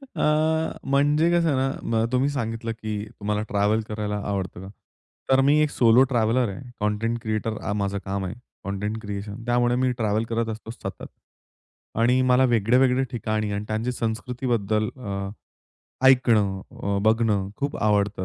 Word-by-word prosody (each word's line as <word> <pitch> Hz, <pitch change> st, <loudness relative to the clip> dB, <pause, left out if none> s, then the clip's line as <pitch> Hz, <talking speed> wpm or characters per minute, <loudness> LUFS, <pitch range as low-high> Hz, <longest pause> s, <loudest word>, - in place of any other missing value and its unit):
अ, -, -, -1 dB, 0.6 s
म्हणजे 145 Hz, +4 st, +3 dB
कसं 165 Hz, -4 st, +2 dB
ना, 135 Hz, +1 st, +1 dB
म 115 Hz, -1 st, +1 dB
तुम्ही 130 Hz, +2 st, +2 dB
सांगितलं, 115 Hz, -4 st, -3 dB
की 110 Hz, -2 st, -4 dB
तुम्हाला 105 Hz, +1 st, -1 dB
ट्रॅव्हल 105 Hz, +2 st, +2 dB
करायला 105 Hz, -1 st, -2 dB
आवडतं 95 Hz, -2 st, -3 dB
का? 95 Hz, -, -9 dB, 0.6 s
तर 130 Hz, 0 st, +5 dB
मी 145 Hz, +3 st, +4 dB
एक 150 Hz, -, +2 dB
सोलो 120 Hz, +2 st, +5 dB
ट्रॅव्हलर 120 Hz, 0 st, +2 dB
आहे, 100 Hz, -, -7 dB, 0.2 s
कंटेंट 110 Hz, +3 st, -1 dB
क्रिएटर 110 Hz, -1 st, -2 dB
हा 100 Hz, -, -1 dB
माझं 100 Hz, -1 st, -1 dB
काम 95 Hz, 0 st, -2 dB
आहे. 95 Hz, +5 st, -5 dB, 0.3 s
Content 100 Hz, +2 st, -3 dB
creation. 105 Hz, +1 st, -6 dB
त्यामुळे 120 Hz, 0 st, +2 dB
मी 130 Hz, 0 st, +1 dB
ट्रॅव्हल 110 Hz, -1 st, +1 dB
करत 115 Hz, 0 st, -1 dB
असतो 110 Hz, 0 st, -6 dB
सतत -, -, -7 dB, 0.9 s
आणि 125 Hz, +2 st, +4 dB
मला 130 Hz, +1 st, +4 dB
वेगळे, 115 Hz, +3 st, +3 dB
वेगळे 130 Hz, 0 st, +3 dB
ठिकाणी 110 Hz, -3 st, -2 dB
आणि 100 Hz, +1 st, -2 dB
त्यांची 110 Hz, +3 st, -1 dB
संस्कृतीबद्दल 115 Hz, -2 st, -1 dB
अ, 100 Hz, -5 st, -4 dB, 0.8 s
ऐकणं, 110 Hz, -7 st, +4 dB, 0.2 s
अ, 100 Hz, 0 st, 0 dB
बघणं 110 Hz, -3 st, +2 dB
खूप 140 Hz, 0 st, -2 dB
आवडतं. 105 Hz, -2 st, +1 dB
110 Hz, 155 wpm, -24 LUFS, 105-125 Hz, 0.9 s, तर